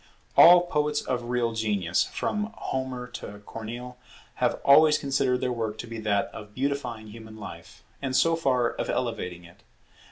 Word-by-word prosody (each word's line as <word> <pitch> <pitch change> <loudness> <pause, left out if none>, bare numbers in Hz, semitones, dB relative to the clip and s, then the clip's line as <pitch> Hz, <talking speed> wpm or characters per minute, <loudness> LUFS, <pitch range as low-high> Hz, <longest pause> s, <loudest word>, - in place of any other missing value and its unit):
All 175 +1 +9
poets 150 -3 -1
of 125 -2 -2
real 120 -1 0
genius, 105 -6 0
from 210 +1 -3
Homer 130 -1 -3
to 105 - -8
Corneille, 120 +3 -7 0.4
have - - +1
always 150 +2 +7
considered 135 -3 0
their 125 - 0
work 110 -2 -3
to - - -6
be 115 -1 -7
that 105 -2 +1
of 105 -1 -10
beautifying 125 -5 -3
human 110 0 -11
life, 105 - -10 0.2
and 135 -2 -2
so 165 +4 +4
far, 130 -7 +1
of - - -4
elevating 90 -8 -3
it. 85 0 -17
125 Hz, 160 wpm, -26 LUFS, 110-140 Hz, 0.4 s, All